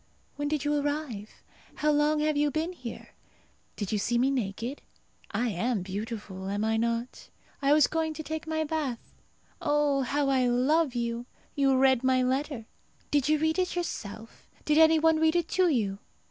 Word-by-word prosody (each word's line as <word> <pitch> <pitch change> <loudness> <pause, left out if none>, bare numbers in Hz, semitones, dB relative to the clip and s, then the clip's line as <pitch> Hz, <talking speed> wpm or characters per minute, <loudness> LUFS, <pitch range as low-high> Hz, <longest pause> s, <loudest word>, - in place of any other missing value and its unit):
When 290 0 -2
did 295 -1 -1
you 295 - +1
arrive? 285 -8 -3 0.3
How 300 0 +2
long 300 +1 +2
have 305 0 +1
you 295 0 +2
been 315 +4 -2
here? 250 -9 -8 0.7
Did 205 -3 -4
you 210 - +1
see 240 +4 0
me 260 +3 +3
naked? 240 +2 -3 0.5
I 235 +4 -1
am 220 +1 -1
beautiful, 195 -1 -5
am 205 +2 -1
I 220 0 +1
not? 230 +2 -2 0.3
I 280 0 +3
was 305 0 +6
going 320 -1 -1
to 315 - -5
take 315 +1 -5
my 315 0 0
bath. 295 -6 -3 0.5
Oh, 290 -2 +2
how 280 +2 0
I 260 -2 +3
love 265 +4 +2
you! 235 0 -2 0.3
You 275 -2 +3
read 260 -1 +4
my 260 -1 +3
letter! 260 -2 -1 0.5
Did 290 -1 +2
you 310 - +4
read 315 +3 +1
it 365 -1 0
yourself? 225 - -6 0.2
Did 300 +1 +3
any 320 0 +7
one 320 0 +3
read 320 +1 +3
it 345 -2 +1
to 370 -1 +3
you? 205 -9 0
275 Hz, 180 wpm, -28 LUFS, 235-310 Hz, 0.7 s, any